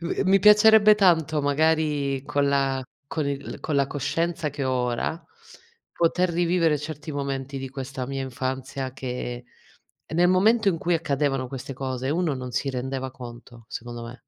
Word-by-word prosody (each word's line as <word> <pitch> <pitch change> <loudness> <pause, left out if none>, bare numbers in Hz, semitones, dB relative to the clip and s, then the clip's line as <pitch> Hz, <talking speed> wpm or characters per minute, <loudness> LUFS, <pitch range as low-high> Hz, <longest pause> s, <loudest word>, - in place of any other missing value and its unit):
Mi 190 +3 +2
piacerebbe 210 0 +7
tanto, 160 -6 +3
magari 145 -2 +1
con 140 0 +1
la 135 -1 +1 0.2
con 150 0 -2
il 140 -1 -5
con 155 - -2
la 140 -1 +3
coscienza 165 +3 -2
che 140 -1 -4
ho 130 - 0
ora, 125 +5 -1 0.7
poter 175 +2 +1
rivivere 170 -2 +2
certi 150 +1 -7
momenti 140 -1 -3
di 135 0 -5
questa 135 -1 -5
mia 135 +1 -4
infanzia 130 +1 -4
che, 125 -2 -5 0.6
nel 175 +2 +2
momento 215 +5 +3
in 165 -4 +1
cui 175 +1 0
accadevano 140 -4 0
queste 135 +1 -7
cose, 130 0 -3
uno 160 -2 0
non 125 -1 -6
si 135 +3 -2
rendeva 130 0 -4
conto, 120 -2 -11
secondo 120 0 -7
me. 120 +2 -9
140 Hz, 155 wpm, -25 LUFS, 130-165 Hz, 0.7 s, piacerebbe